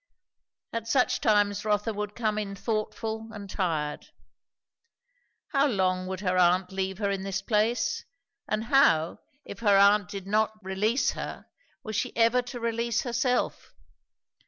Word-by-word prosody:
At 230 -1 -3
such 255 +1 +2
times 205 -1 +2
Rotha 210 +1 0
would 210 0 -4
come 215 -3 0
in 200 -2 -4
thoughtful 220 +1 -3
and 205 -2 -8
tired. 160 -7 -2 1.4
How 280 0 +3
long 185 -5 0
would 190 0 -4
her 185 -2 +1
aunt 180 +1 +3
leave 190 0 -2
her 200 -1 0
in 195 -1 -2
this 195 0 -3
place? 225 +2 +1 0.5
and 215 +1 0
how, 175 - +3 0.3
if - - -9
her 205 -3 +4
aunt 200 -1 +5
did 195 -2 -6
not 215 +2 +1
release 210 +7 +1
her, - - -7 0.4
was 215 -1 -5
she 250 - -2
ever 230 +2 +4
to 245 0 -8
release 230 0 0
herself? 250 0 -1
210 Hz, 145 wpm, -27 LUFS, 190-230 Hz, 1.4 s, aunt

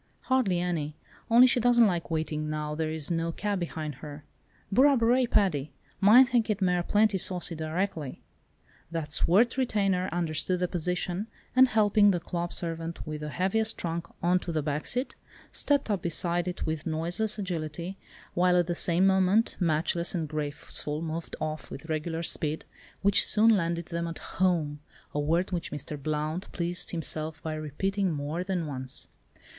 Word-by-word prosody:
"Hardly 250 -9 +1
any, 160 -4 -2 0.3
only 235 +2 +8
she 255 -1 +3
doesn't 240 0 +5
like 175 -5 -1
waiting, 155 -1 -2
now 150 0 -3
there 155 0 -2
is 155 +1 -3
no 165 0 0
cab 205 +3 -2
behind 160 -3 -4
her. 150 -1 -8 0.5
Burra 275 +6 +5
burrai, 240 +1 +3
Paddy! 155 -8 +1 0.3
Mine 220 +7 +8
thinkit 225 -4 +1
mare 180 -2 +2
plenty 205 +2 +2
saucy 180 -1 0
direckaly." 160 -2 -3 0.7
That 160 -3 -4
swart 225 +12 +3
retainer 195 -7 +1
understood 175 +1 -1
the 180 - +2
position, 180 +3 -2 0.3
and 260 0 +7
helping 210 -2 +4
the 180 -3 +2
club 170 0 -4
servant 165 -1 -3
with 155 -1 -5
the 150 - -4
heaviest 205 +7 0
trunk 170 0 -3 0.2
on 180 +1 +3
to 175 - -5
the 155 -2 -1
back 150 0 -2
seat, 250 +2 -1 0.4
stepped 285 -6 +1
up 200 -4 0
beside 170 +1 +1
it 180 - -3
with 155 0 -3
noiseless 175 +7 0
agility, 175 -1 -4 0.3
while 180 0 +3
at 175 - +3
the 175 - -1
same 175 +2 +4
moment 190 +3 +3
"Matchless" 170 +1 0
and 165 -3 -1
"Graceful" 150 +1 -4
moved 165 +1 -5
off 155 0 -4
with 140 - -8
regulated 160 +2 -2
speed, 155 0 -2 0.4
which 200 0 +5
soon 220 +1 +5
landed 170 -2 -2
them 170 0 -2
at 165 - -5
"home"—a 150 -5 -2
word 165 +6 +1
which 175 -2 -3
Mr. 150 +1 -5
Blount 155 +4 -3
pleased 175 0 -1
himself 155 -2 -3
by 160 - -3
repeating 185 +6 -1
more 150 +3 -3
than 185 -3 -2
once. 130 -3 -5
170 Hz, 160 wpm, -28 LUFS, 155-195 Hz, 0.7 s, only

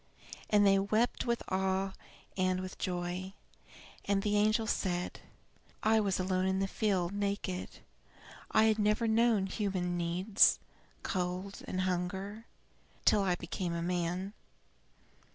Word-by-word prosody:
And 205 -1 +5
they 195 0 +5
wept 215 +6 0
with 235 0 0
awe 190 0 0 0.4
and 185 -1 +1
with 185 0 -7
joy. 180 +1 -3 0.7
And 200 -1 +1
the 210 -1 +1
angel 215 +2 +3
said: 180 -4 -2 0.6
"I 220 0 +4
was 200 -3 0
alone 185 0 0
in 190 0 +1
the 195 0 0
field, 190 -3 0
naked. 200 -2 -3 0.7
I 220 - +4
had 220 0 +3
never 210 +2 +2
known 225 -2 +3
human 185 -3 -2
needs, 180 +5 +3 0.5
cold 185 +1 -3
and 185 - -2
hunger, 190 +4 -3 0.6
till 205 - +5
I 185 -2 +2
became 170 0 -4
a 170 - -2
man. 180 +2 -2
190 Hz, 130 wpm, -32 LUFS, 180-210 Hz, 0.7 s, And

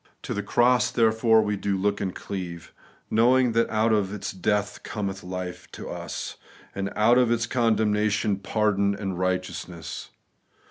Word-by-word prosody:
To - - -3
the 105 - -2
cross, 120 +4 +3
therefore, 110 -1 +4
do 100 0 -1
we - - -2
look 100 +1 0
and 95 -2 -2
cleave; 90 -4 -6 0.4
knowing 125 +2 +4
that 115 +1 +2
out 110 +1 +2
of 100 -3 +1
its 105 -1 -4
death 105 +2 -1
cometh 100 -2 -4
life 90 0 -6
to - - -7
us, - - -5 0.4
and 100 0 -3
out 120 +4 +5
of 125 -2 +3
its 115 -1 +1
condemnation 105 -3 +1
pardon 100 0 +1
and 95 -3 -4
righteousness. 90 -2 -3
105 Hz, 150 wpm, -25 LUFS, 95-110 Hz, 0.4 s, out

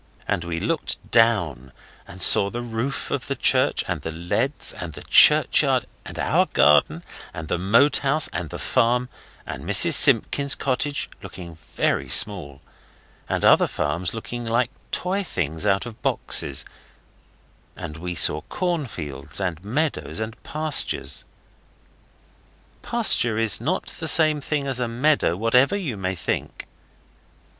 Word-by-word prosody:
And 85 - -2
we 85 -1 -4
looked 150 - -3
down 90 - +1 0.4
and 90 +1 -7
saw 100 - +5
the 120 +3 -6
roof 120 +4 -5
of 135 -1 -3
the 140 - -3
church, - - +1
and - - -4
the - - -6
leads, 85 +2 -1
and - - -8
the - - -11
churchyard, - - +5 0.2
and - - -10
our - - +1
garden, 75 0 +2 0.3
and 80 0 -7
the 85 - -2
Moat 115 +10 +3
House, 145 +2 +1
and 90 -3 -5
the - - -7
farm, 125 +2 0 0.4
and - - -8
Mrs - - +4
Simpkins's 140 0 +4
cottage, 140 +2 -2
looking 85 -2 -10
very 80 - -3
small, 80 -10 0 0.7
and - - -1
other - - +5
farms 85 +5 -3
looking 120 +2 -7
like 120 +2 -1 0.2
toy 190 +3 -1
things 80 - -3
out 100 +2 +1
of 115 -2 -11
boxes, - - 0 1.1
and 80 -1 -8
we 90 +1 -6
saw 75 -1 +3
corn 175 -6 -2
fields 75 - -6
and 90 -3 -4
meadows 140 +3 -2
and 110 +1 -6
pastures. 145 - +1 1.6
A - - -17
pasture 115 -3 +2
is 115 -1 0
not 175 +10 -2
the 160 - -4
same 155 -1 +4
thing 145 0 -3
as 135 -2 -2
a 125 - -1
meadow, 125 - 0
whatever 125 - +2
you 160 - -4
may 95 -1 -4
think. 85 - -5
115 Hz, 145 wpm, -22 LUFS, 85-140 Hz, 1.6 s, saw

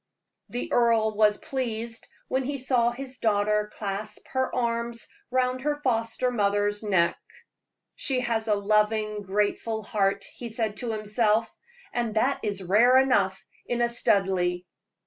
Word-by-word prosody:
The 245 - -4
earl 225 -2 +3
was 210 0 +4
pleased 230 -3 -3 0.2
when 265 +1 0
he 280 +2 -2
saw 250 -2 +2
his 255 +1 -7
daughter 210 -1 +1
clasp 210 +1 -5
her 260 0 0
arms 235 -1 -2 0.2
round 255 0 0
her 295 +2 0
foster 230 0 0
mother's 205 -2 +1
neck. 190 -6 +1 0.8
"She 260 -2 0
has 230 -2 -1
a 210 - +3
loving, 210 +1 +1
grateful 210 +3 -1
heart," 200 -2 0
he 240 - -7
said 220 -2 -2
to 240 -2 -3
himself, 215 +1 +1 0.4
"and 235 -3 -1
that 255 +5 +2
is 200 -3 -3
rare 225 +8 +5
enough 205 -8 +2 0.2
in 240 - -1
a 235 - +2
Studleigh." 190 -6 +1
220 Hz, 140 wpm, -26 LUFS, 205-245 Hz, 0.8 s, rare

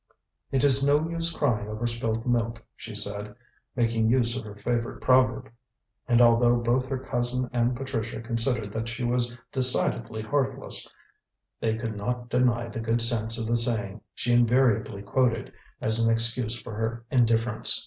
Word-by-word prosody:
"It 135 0 +1
is 135 -1 +6
no 145 +3 +3
use 165 0 -2
crying 120 -10 -1
over 110 +2 -4
spilt 115 -1 -2
milk," 115 -2 -1
she 110 - -9
said, 105 0 -4 0.4
making 115 -2 +1
use 120 -1 +2
of 130 - -4
her 105 -1 -9
favourite 115 +3 -3
proverb; 130 -1 +2 0.6
and 120 -2 +3
although 120 +1 +5
both 120 +2 0
her 135 0 -2
cousin 125 0 -2
and 120 +1 +1
Patricia 115 -4 -4
considered 115 -2 -1
that 115 +1 -3
she 120 +1 -5
was 120 0 0
decidedly 110 - +2
heartless, 135 +3 -1 0.7
they 110 -1 -1
could 115 -1 -4
not 120 +4 -4
deny 120 -1 +1
the 115 - -6
good 115 +1 0
sense 115 -1 0
of 115 - -3
the 115 +1 0
saying 110 -3 -1
she 120 - -1
invariably 120 -4 +2
quoted 125 +1 0 0.3
as 110 +1 +1
an 115 - +3
excuse 115 +1 +2
for 110 +1 -9
her 115 +2 -3
indifference. 115 -2 +2
120 Hz, 160 wpm, -26 LUFS, 115-125 Hz, 0.7 s, is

